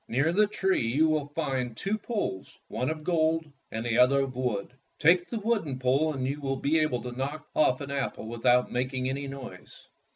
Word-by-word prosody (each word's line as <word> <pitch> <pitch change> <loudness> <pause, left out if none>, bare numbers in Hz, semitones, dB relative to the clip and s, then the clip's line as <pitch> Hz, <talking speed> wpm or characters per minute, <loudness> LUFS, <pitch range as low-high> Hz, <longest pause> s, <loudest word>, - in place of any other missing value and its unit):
Near 140 +7 +1
the 210 +3 +4
tree 190 - 0
you 145 +7 +3
will 155 -2 0
find 130 -7 -2
two 200 +2 -1
poles, 210 - -4
one 125 - -1
of 155 -1 -4
gold 160 -1 +1 0.3
and 110 +1 -4
the 120 0 +1
other 135 +2 +5
of 135 -2 -3
wood. 125 -4 -2 0.2
Take 175 +3 +4
the 235 - -3
wooden 210 - -1
pole, 135 +5 +2
and 135 -3 -3
you 145 +2 -3
will 135 -1 -1
be 145 +4 +1
able 155 -6 0
to 125 - -5
knock 140 +5 -4
off 130 -3 +3
an 140 0 -5
apple 135 -5 -3
without 120 +2 +2
making 130 +1 -1
any 140 +2 -3
noise." 135 -2 -10
140 Hz, 200 wpm, -28 LUFS, 125-160 Hz, 0.3 s, other